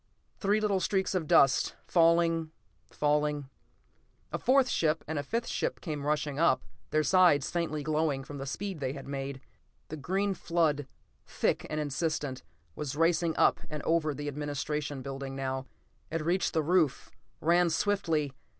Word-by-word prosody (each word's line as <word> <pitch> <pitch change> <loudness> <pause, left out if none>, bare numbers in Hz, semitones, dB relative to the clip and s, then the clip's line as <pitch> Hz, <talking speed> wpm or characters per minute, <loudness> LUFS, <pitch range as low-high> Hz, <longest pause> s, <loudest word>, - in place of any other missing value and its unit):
Three 205 +1 +2
little 205 -3 +1
streaks 190 +1 0
of 175 -5 -1
dust, 135 -2 +4
falling, 165 -1 +3 0.4
falling.... 150 -2 0 0.8
A - - -2
fourth 260 0 +4
ship, 160 -7 +1
and 155 -1 -2
a - - -3
fifth 230 +10 -2
came 150 -3 -4
rushing 150 -1 -1
up, 170 - +3 0.3
their 155 0 +2
sides 175 -6 +4
faintly 155 -4 -2
glowing 150 -2 0
from 140 +1 -8
the 135 - -5
speed 190 +3 -4
they 135 -1 -2
had 135 -1 -9
made. 135 -1 -4 0.5
The 155 - -5
green 195 +8 0
flood, 160 -6 0 0.4
thick - - 0
and 155 - -2
insistent, 145 -2 -2 0.3
was 145 -2 -4
racing 165 +1 +2
up - - +4
and 150 -1 -5
over 160 -3 +1
the 145 +1 -5
administration 145 -1 -3
building 135 0 -5
now. 130 0 -3 0.4
It 165 -1 -3
reached 180 +2 +1
the 160 - +1
roof, 165 -4 +1 0.3
ran 170 +2 +3
swiftly.... 160 -5 0
155 Hz, 150 wpm, -30 LUFS, 145-170 Hz, 0.8 s, dust